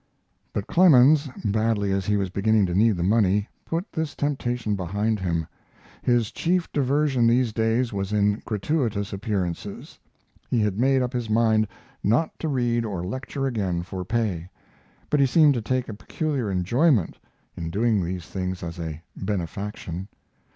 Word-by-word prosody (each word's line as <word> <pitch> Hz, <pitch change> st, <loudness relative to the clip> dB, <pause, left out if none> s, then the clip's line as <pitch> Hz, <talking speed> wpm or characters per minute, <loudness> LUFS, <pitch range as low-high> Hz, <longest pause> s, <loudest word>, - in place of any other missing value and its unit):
But 100 Hz, -, -3 dB
Clemens, 150 Hz, -4 st, +5 dB, 0.2 s
badly 105 Hz, -1 st, +1 dB
as 95 Hz, -1 st, -1 dB
he 105 Hz, 0 st, +2 dB
was 95 Hz, -2 st, -1 dB
beginning 105 Hz, +1 st, +3 dB
to 90 Hz, -, -2 dB
need 105 Hz, +1 st, +3 dB
the 85 Hz, -, -1 dB
money, 100 Hz, +1 st, +2 dB, 0.2 s
put 170 Hz, +5 st, -3 dB
this 160 Hz, -3 st, -3 dB
temptation 125 Hz, -6 st, -1 dB
behind 100 Hz, +4 st, -1 dB
him. 85 Hz, -3 st, -1 dB, 0.6 s
His 120 Hz, -3 st, +1 dB
chief 180 Hz, 0 st, 0 dB
diversion 140 Hz, -3 st, +2 dB
these 120 Hz, -1 st, +2 dB
days 115 Hz, +2 st, +1 dB
was 100 Hz, 0 st, -3 dB
in 105 Hz, 0 st, +2 dB
gratuitous 105 Hz, -2 st, -1 dB
appearances. 100 Hz, -2 st, -4 dB, 0.5 s
He 120 Hz, -, +1 dB
had 105 Hz, -1 st, 0 dB
made 135 Hz, +1 st, +3 dB
up 125 Hz, +1 st, -3 dB
his 120 Hz, -3 st, -3 dB
mind 110 Hz, -1 st, +3 dB, 0.4 s
not 120 Hz, +10 st, +2 dB
to 160 Hz, -, -2 dB
read 120 Hz, -4 st, +1 dB
or 95 Hz, -6 st, -4 dB
lecture 130 Hz, +6 st, -4 dB
again 95 Hz, -9 st, -1 dB
for 90 Hz, +1 st, -5 dB
pay, 95 Hz, -5 st, -2 dB, 0.6 s
but 150 Hz, -, +3 dB
he 140 Hz, -, +5 dB
seemed 150 Hz, +2 st, +5 dB
to 120 Hz, -, -2 dB
take 125 Hz, +3 st, -1 dB
a 110 Hz, -, -5 dB
peculiar 130 Hz, +3 st, -3 dB
enjoyment 105 Hz, -, +2 dB, 0.4 s
in 80 Hz, -1 st, -4 dB
doing 105 Hz, +1 st, +1 dB
these 90 Hz, -1 st, -4 dB
things 95 Hz, +2 st, -4 dB
as 85 Hz, 0 st, -6 dB
a 80 Hz, -1 st, -5 dB
benefaction. 95 Hz, -1 st, -4 dB
110 Hz, 160 wpm, -25 LUFS, 95-125 Hz, 0.6 s, Clemens